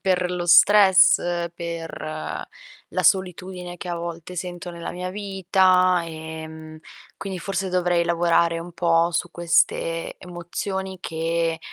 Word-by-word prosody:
per 180 -2 +1
lo 180 -1 -3
stress, 175 -3 +5
per 165 -2 -6 0.5
la - - 0
solitudine 180 -1 0
che 180 - -7
a 175 - -2
volte 170 +1 -7
sento 175 0 -5
nella 170 -1 -6
mia 180 +1 -5
vita 185 -2 +2
e, 160 -1 -7
mhmm, 160 0 -11 0.4
quindi 190 -2 -5
forse 195 0 -3
dovrei 175 -1 +1
lavorare 170 0 +2
un 170 +1 -8
po' 170 0 +2
su 170 - -1
queste 165 -1 0
emozioni, 185 +2 -5
che 165 -1 -1
175 Hz, 130 wpm, -23 LUFS, 165-185 Hz, 0.5 s, stress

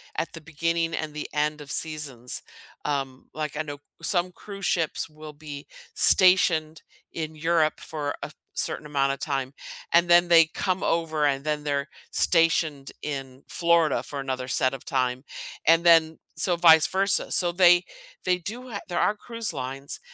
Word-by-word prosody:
at - - -3
the 165 - -9
beginning 165 +1 -1
and 155 -1 -4
the 150 - -4
end 150 0 -1
of 145 - -9
seasons. 145 -7 -3 0.4
Um, 135 -3 -3
like 150 -1 -4
I 155 - -1
know 145 -1 -7 0.2
some 180 -1 0
cruise 200 +1 -8
ships 165 -1 -1
will 155 0 -11
be 145 -1 -9 0.3
stationed 165 -4 +4 0.3
in 155 -1 -5
Europe 160 0 +1
for 145 -2 -4
a - - -6 0.2
certain - - -2
amount 140 -2 +1
of 140 - -8
time, 135 -2 -3 0.4
and 170 +1 +5
then 175 0 +6
they 165 -1 +7
come 185 -1 -1
over, 160 -2 0
and 140 -1 0
then 150 -1 -2
they're 140 -1 -1 0.2
stationed 160 -4 +2
in 135 -2 -6
Florida 170 -4 +2
for 140 - -7
another 130 -1 -4
set 130 0 +1
of 135 - -12
time, 130 -1 -1 0.4
and 165 +1 +5
then, 165 -2 +5 0.2
so 180 -2 +1
vice 160 -2 +7
versa, 195 +1 +1
so 175 -2 +4
they 175 0 +5 0.4
they 180 0 +2
do 235 +8 -7
ha 200 -4 -5
there 175 - -1
are 210 - +2
cruise 230 +1 -5
lines 135 +2 -5
155 Hz, 165 wpm, -25 LUFS, 145-170 Hz, 0.4 s, they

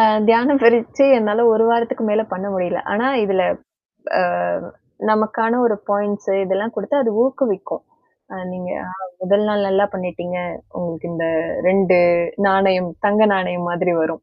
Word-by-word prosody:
அ. - - +6 0.3
தியானப் 255 +5 +4
பயிற்சி 235 +4 +4
என்னால 215 +1 +1
ஒரு 225 +1 +3
வாரத்துக்கு 235 0 0
மேல 215 +1 +2
பண்ண 185 +2 -4
முடியலை. 180 -1 -2
ஆனா 230 +5 0 0.2
இதுல 190 -2 +1 0.8
அ. - - +2 0.9
நமக்கான 225 +2 +1
ஒரு 210 -3 +1
பாயிண்ட்ஸ் 205 0 -2
இதெல்லாம் 195 +4 -2
கொடுத்து 210 +8 -2
அது 225 - 0
ஊக்குவிக்கும். 255 -8 -2 0.7
நீங்க 180 0 -7 0.5
முதல் 200 +3 +2
நாள் 205 -1 0
நல்லாப் 200 +2 +1
பண்ணிட்டீங்க, 180 -1 -5 0.4
உங்களுக்கு 170 -1 -6
இந்த 165 0 -3 0.4
2 190 -1 +4 0.5
நாணயம் 190 -2 +2 0.2
தங்க 210 +1 +3
நாணயம் 180 -2 -2
மாதிரி 175 0 0
வரும். 160 0 -3
200 Hz, 135 wpm, -19 LUFS, 185-225 Hz, 0.9 s, அ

